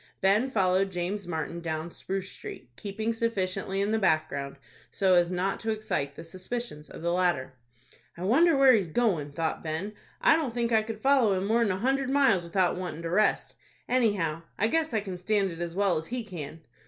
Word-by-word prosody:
Ben 205 +7 +3
followed 195 -4 +2
James 180 +2 -3
Martin 170 0 -3
down 160 0 -4
Spruce 190 +1 -4
Street, 125 -1 -9
keeping 215 - -3
sufficiently 195 -4 -1
in 205 +2 0
the 220 - +2
background, 155 -7 0 0.3
so 190 -2 +2
as 175 -1 +4
not 185 +2 -1
to 225 - -4
excite 215 -10 -2
the 165 - -8
suspicions 185 -1 -6
of - - -10
the 170 0 +1
latter. 175 -8 +1 0.6
"I 175 - -6
wonder 295 - +4
where 270 -1 +7
he's 200 -6 +2
goin'," 160 -6 0
thought 160 +2 -2
Ben; 165 +6 -4 0.3
"I - - +5
don't 270 -8 -3
think 235 -1 0
I 220 -1 +4
could 215 0 -7
follow 265 -7 +4
him 185 - -2
more'n 225 +1 +2
a 185 - 0
hundred 265 +4 0
miles 270 -10 +3
without 180 +1 +1
wantin' 170 -3 -5
to 165 - -3
rest. 210 +4 +2 0.3
Anyhow 205 -11 +1 0.2
I 220 +3 +2
guess 320 +1 +1
I 220 -2 0
can 190 -3 -6
stand 200 0 +1
it 165 - -9
as 170 0 -4
well 195 -4 +2
as 160 - -7
he 245 0 -3
can." 165 -6 -8
195 Hz, 200 wpm, -28 LUFS, 170-225 Hz, 0.6 s, where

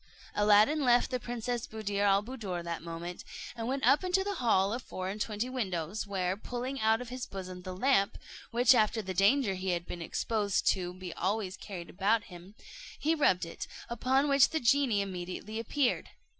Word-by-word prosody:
Aladdin 210 +9 +4
left 245 0 +4
the 255 - 0
Princess 240 0 -3
Buddir 205 -2 -3
al 200 0 +4
Buddoor 205 -8 -5
that 170 -1 -4
moment, 170 +1 -6 0.3
and 230 -1 -4
went 270 +2 -1
up 290 - +5
into 370 +1 +2
the 405 +1 -2
hall 215 - +2
of 245 - -3
four 185 -5 -5
and 210 +2 -5
twenty 215 +3 -2
windows, 200 -6 -3
where, 185 -2 -1
pulling 250 +5 -5
out 220 +2 +3
of 250 - -7
his 255 0 -5
bosom 185 -2 -7
the 185 0 -7
lamp, 230 -3 +2 0.3
which 245 +2 +5
after 220 -1 +2
the 185 -1 -4
danger 200 +4 +3
he 190 0 -3
had 170 0 -3
been 175 - -6
exposed 205 +3 -1
to 180 -2 +1
be 185 -2 -7
always 195 0 -1
carried 180 -5 -8
about 205 +4 +2
him, 180 +4 -12 0.4
he 315 +2 +1
rubbed 195 - +3
it; 165 - -7 0.2
upon 260 +4 +2
which 275 -1 +5
the 320 - -1
genie 245 -4 +3
immediately 190 +3 -5
appeared. 245 +3 0
215 Hz, 185 wpm, -31 LUFS, 185-250 Hz, 0.4 s, up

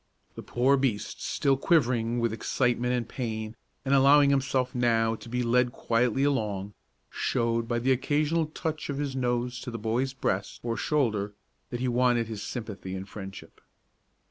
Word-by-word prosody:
The - - -8
poor 130 +3 +2
beast, 130 -6 -2
still 140 -1 +1
quivering 120 -6 +2
with 115 -2 0
excitement 120 +2 0
and 120 -2 -2
pain, 110 -3 -4 0.3
and 135 - +2
allowing 140 +1 +6
himself 135 -2 +1
now 115 -2 +2
to 115 - -9
be 125 +1 -1
led 125 +1 +3
quietly 120 +3 +1
along, 105 -8 -1 0.4
showed 115 0 0
by 120 0 0
the 125 +3 +1
occasional 150 +5 +1
touch 155 -1 -4
of 140 - -2
his 140 -2 -2
nose 120 -1 -1
to 130 - -6
the 115 - -5
boy's 115 +5 -1
breast 100 -6 -2
or 115 -1 -1
shoulder 105 -7 0 0.3
that 120 -1 -4
he 130 - 0
wanted 120 -1 +2
his 110 -2 -6
sympathy 105 -4 -5
and 95 +1 -7
friendship. 95 -2 -9
120 Hz, 165 wpm, -28 LUFS, 115-135 Hz, 0.4 s, allowing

